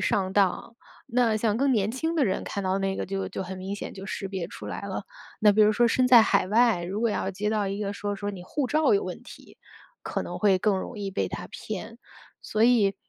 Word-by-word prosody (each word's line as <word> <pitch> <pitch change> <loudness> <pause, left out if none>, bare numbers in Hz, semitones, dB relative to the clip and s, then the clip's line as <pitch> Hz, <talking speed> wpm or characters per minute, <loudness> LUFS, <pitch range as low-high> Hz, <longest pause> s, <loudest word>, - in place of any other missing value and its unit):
上 190 -2 0
当。 200 +3 +1 0.3
那 235 -3 +2
像 215 -1 +1
更 275 +1 +2
年 215 -4 +2
轻 320 +7 -2
的 300 -5 +3
人， 190 - -1
看 200 - -4
到 190 +1 +1
那 195 0 -1
个 - - -2
就 195 0 -3
就 - - -4
很 190 0 -7
明 190 +2 -5
显 - - -6
就 195 0 -9
识 195 - -4
别 190 -3 -4
出 - - -10
来 - - -5
了。 200 0 -5 0.3
那 210 -1 +5
比 215 - +2
如 210 - +6
说 240 +3 +3
身 250 +2 +2
在 240 -3 +9
海 185 - +2
外， 225 -4 +3
如 185 +4 -4
果 230 -1 +2
要 190 - -1
接 205 +2 -2
到 210 -2 0
一 195 +1 -3
个 205 -1 -2
说， 205 0 -4
说 205 0 -3
你 190 -3 -8
护 270 +9 -2
照 310 - +3
有 405 +1 +1
问 - - -6
题， - - -14 0.4
可 - - -3
能 - - -6
会 200 -3 +3
更 195 0 +1
容 210 +3 -6
易 200 -1 -3
被 195 - -1
它 - - -6
骗。 220 +3 -7 0.4
所 215 +1 +1
以， 225 -5 +4
205 Hz, 265 characters per minute, -26 LUFS, 195-230 Hz, 0.4 s, 在